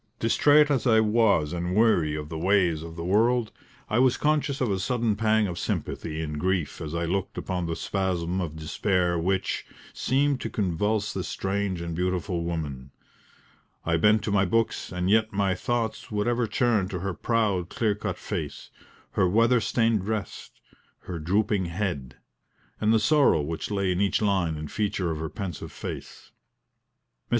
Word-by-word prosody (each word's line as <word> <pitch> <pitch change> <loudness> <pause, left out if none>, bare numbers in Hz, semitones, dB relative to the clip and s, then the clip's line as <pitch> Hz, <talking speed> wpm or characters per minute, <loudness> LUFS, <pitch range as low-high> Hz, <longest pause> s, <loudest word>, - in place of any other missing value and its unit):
Distrait 145 +6 +4
as 130 -4 +1
I 110 -2 +5
was 105 -8 +3
and 90 +1 -2
weary 90 -9 +3
of 75 -1 -5
the 80 - -5
ways 90 -3 +2
of 80 0 -8
the 85 0 -5
world, 115 +4 +2 0.4
I 110 - +1
was 130 -1 +4
conscious 150 -2 +1
of 125 -5 0
a 95 - 0
sudden 115 0 0
pang 110 0 +2
of 90 -3 -4
sympathy 80 -1 -3
and 75 -1 -4
grief 95 -2 -1
as 80 +1 -5
I 85 0 -1
looked 95 +3 -2
upon 90 -2 -2
the 85 - -2
spasm 95 -2 -1
of 80 -3 -4
despair 85 +3 0
which, 95 +2 -1 0.3
seemed 140 0 +1
to - - -3
convulse 105 +2 -1
this 95 - -3
strange 95 -2 -2
and 85 -1 -4
beautiful 90 0 -1
woman. 75 -6 -4 1.0
I 85 0 +2
bent 105 +5 +4
to 105 - -2
my 100 -1 +3
books, 115 +4 0
and 90 0 -2
yet 110 +2 +3
my 100 -1 +1
thoughts 115 +2 -2
would 105 +1 -1
ever 120 -1 +1
turn 115 -6 +1
to 90 -2 -4
her 95 0 -2
proud 100 -5 0
clear 110 -3 0
cut 105 - -4
face, - - -5 0.4
her 95 - +2
weather 115 +4 +4
stained 115 -2 +1
dress, 105 +1 -4 0.5
her 85 -2 -6
drooping 100 +4 +1
head, 85 -8 -3 0.6
and 110 0 +2
the 110 - +4
sorrow 135 - +4
which 80 +2 -4
lay 100 -2 0
in 90 +2 0
each 100 - +2
line 95 -7 +1
and 75 -1 -6
feature 100 -5 -1
of 80 - -4
her 80 0 -3
pensive 90 -4 -6
face. - - -8
Mrs. - - -52
95 Hz, 175 wpm, -26 LUFS, 85-110 Hz, 1.0 s, I